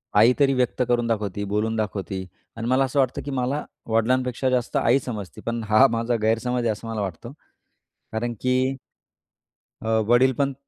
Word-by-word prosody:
आई 110 +4 +6
तरी 135 -1 +4
व्यक्त 125 0 0
करून 120 -1 +1
दाखवती, 105 -3 -2
बोलून 105 +3 -1
दाखवती 100 -3 -3 0.3
आणि 115 +1 -3
मला 130 +2 +3
असं 135 +2 0
वाटतं, 130 -2 +1
की 145 - -4
मला 135 +3 -1 0.2
वडिलांपेक्षा 125 +3 +1
जास्त 125 -2 0
आई 125 +4 +3
समजती, 105 - -7
पण 115 0 -2
हां 110 +6 +7
माझा 115 +1 0
गैरसमज 115 +3 +1
आहे, 115 - +2
असं 110 +2 -7
मला 110 -2 -3
वाटतं. 100 +6 -5 0.8
कारण 120 +2 -2
की, 130 +1 +1 1.0
अ, 110 - -6 0.2
वडीलपण 130 +3 +3
120 Hz, 165 wpm, -24 LUFS, 110-130 Hz, 1.0 s, हां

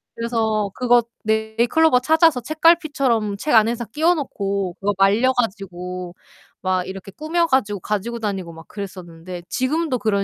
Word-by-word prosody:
그래서 220 -3 -1
그거 245 -1 +3 0.2
네잎클로버 230 +7 +2
찾아서 320 0 +3
책갈피처럼 280 - +2
책 300 - -2
안에다 230 +2 +3
끼워 325 +4 +3
놓고 200 - -3
그거 205 +1 0
말려 210 +7 +3
가지고 185 -6 -4 0.5
막 185 -1 0
이렇게 195 +1 -8
꾸며 325 - 0
가지고 210 -9 +1
가지고 215 +3 -3
다니고 195 -6 -4
막 160 +1 -13
그랬었는데 180 -3 -8
지금도 265 +1 -1
그런 200 -3 +1
220 Hz, 345 characters per minute, -21 LUFS, 195-260 Hz, 0.5 s, 그거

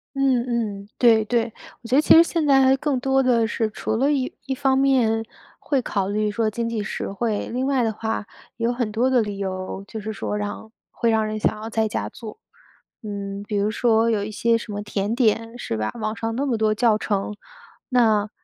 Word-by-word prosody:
嗯 265 -3 +2 0.4
嗯。 200 - -19
对 225 -3 +5
对。 230 0 0 0.3
我 235 - -10
觉 250 - +1
得 290 - +6
其 - - +6
实 330 - +9
现 335 -2 -1
在 275 -2 +5
还 265 0 +5
更 275 -2 -1
多 270 +1 +2
的 240 -3 +3
是 225 -1 -1
除 220 - -3
了 270 +6 +2
一 265 -3 -1
一 265 -1 -2
方 265 0 +2
面 250 -5 +3 0.4
会 275 -3 0
考 200 -5 -1
虑 210 +1 0
说 220 +1 0
经 230 +2 -3
济 230 -2 -2
实 205 - -4
惠， 210 +1 -2
另 250 +2 -1
外 270 -2 +2
的 225 - +1
话 220 0 -3 0.3
有 230 +1 0
很 240 -3 -2
多 235 +4 +1
的 255 -2 +4
理 205 -2 -4
由， 190 0 -4
就 220 - -6
是 215 +1 -5
说 105 - -3
让 105 - -5 0.2
会 235 - 0
让 220 -1 +2
人 215 0 -3
想 215 0 0
要 220 - -5
在 220 -1 +1
家 210 - -3
做。 230 - -10 0.6
嗯， 200 -1 -5
比 215 - -3
如 200 +1 +1
说 225 +1 +2
有 215 -3 +1
一 215 - -5
些 230 +2 +2
什 230 -1 -8
么 205 0 -4
甜 205 0 -2
点， 230 -1 +1
是 115 - -4
吧， 110 0 -2
网 215 +1 -2
上 225 0 -3
那 275 +4 -1
么 250 -5 0
多 215 -1 +2
教 225 -1 +3
程， 210 -1 -2 0.5
那 220 -5 +3
225 Hz, 240 characters per minute, -23 LUFS, 210-250 Hz, 0.6 s, 实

